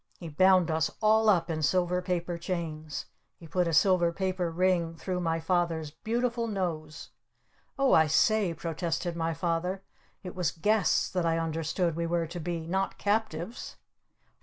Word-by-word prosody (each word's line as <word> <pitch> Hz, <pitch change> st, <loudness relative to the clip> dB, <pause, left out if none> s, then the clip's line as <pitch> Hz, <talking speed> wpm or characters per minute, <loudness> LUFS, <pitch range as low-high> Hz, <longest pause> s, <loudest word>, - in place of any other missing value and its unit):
He 170 Hz, -, -8 dB
bound 185 Hz, +2 st, +4 dB
us 160 Hz, 0 st, +1 dB
all 220 Hz, 0 st, +4 dB
up 170 Hz, -5 st, +3 dB
in 155 Hz, -1 st, -2 dB
silver 180 Hz, +3 st, +1 dB
paper 175 Hz, -1 st, -2 dB
chains! 160 Hz, -4 st, -4 dB, 0.3 s
He 170 Hz, -, -13 dB
put 180 Hz, +2 st, 0 dB
a -, -, 0 dB
silver 175 Hz, +1 st, +4 dB
paper 185 Hz, -1 st, -2 dB
ring 170 Hz, -1 st, +1 dB
through 180 Hz, +2 st, -3 dB
my 165 Hz, -2 st, 0 dB
Father's 165 Hz, -2 st, -1 dB
beautiful 235 Hz, +5 st, -2 dB
nose! 165 Hz, -7 st, -4 dB, 0.7 s
"Oh, 275 Hz, -1 st, +3 dB
I 160 Hz, -1 st, +6 dB
say," 205 Hz, +4 st, +3 dB
protested 170 Hz, +1 st, -3 dB
my 165 Hz, -1 st, -1 dB
Father. 180 Hz, +3 st, -2 dB, 0.4 s
"It 180 Hz, -, -7 dB
was 180 Hz, -4 st, 0 dB
'guests' 200 Hz, 0 st, +1 dB
that 180 Hz, -3 st, 0 dB
I 165 Hz, 0 st, +1 dB
understood 165 Hz, +1 st, -1 dB
we 170 Hz, 0 st, -2 dB
were 170 Hz, 0 st, 0 dB
to 170 Hz, +2 st, -7 dB
be! 170 Hz, 0 st, -3 dB
Not 190 Hz, +3 st, -1 dB
captives!" 205 Hz, -1 st, -2 dB
175 Hz, 160 wpm, -29 LUFS, 165-185 Hz, 0.7 s, I